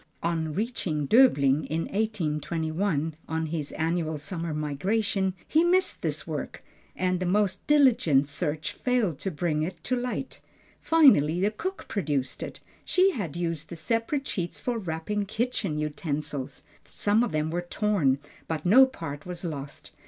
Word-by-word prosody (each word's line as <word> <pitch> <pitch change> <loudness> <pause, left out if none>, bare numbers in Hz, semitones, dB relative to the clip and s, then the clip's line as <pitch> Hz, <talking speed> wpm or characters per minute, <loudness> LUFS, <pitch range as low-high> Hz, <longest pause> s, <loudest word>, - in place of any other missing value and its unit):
On 165 -2 0
reaching 185 - -1
Döbling 150 - +5
in 160 +1 -1
1821 160 -4 -1
on 160 0 -1
his 155 -2 -3
annual 160 -1 -1
summer 165 +1 -3
migration, 190 +6 0
he 320 +2 +4
missed 365 +2 +2
this - - -2
work - - -5 0.3
and 185 -1 0
the 185 - -1
most 195 0 +1
diligent 240 - +5
search 150 +2 -3
failed 235 - 0
to 195 - -2
bring 155 -2 -1
it 175 +3 -4
to 255 - 0
light. 250 +2 -4 0.4
Finally 215 - +5
the 200 +3 +2
cook 375 - -5
produced 145 -10 -2
it; - - -6 0.2
she 375 +1 +4
had 180 - -4
used 165 -2 -3
the 170 - -6
separate 230 - -1
sheets 175 -8 -3
for 245 -2 -2
wrapping 195 +3 -3
kitchen 220 -7 -1
utensils. 150 -3 -3 0.2
Some 210 +2 +1
of 240 - -1
them 155 0 -1
were 175 +1 -1
torn, 175 -7 +1 0.3
but 160 -1 -3
no 255 +9 +8
part 160 - -7
was 180 0 -6
lost. 145 -4 -6
175 Hz, 150 wpm, -27 LUFS, 155-215 Hz, 0.4 s, no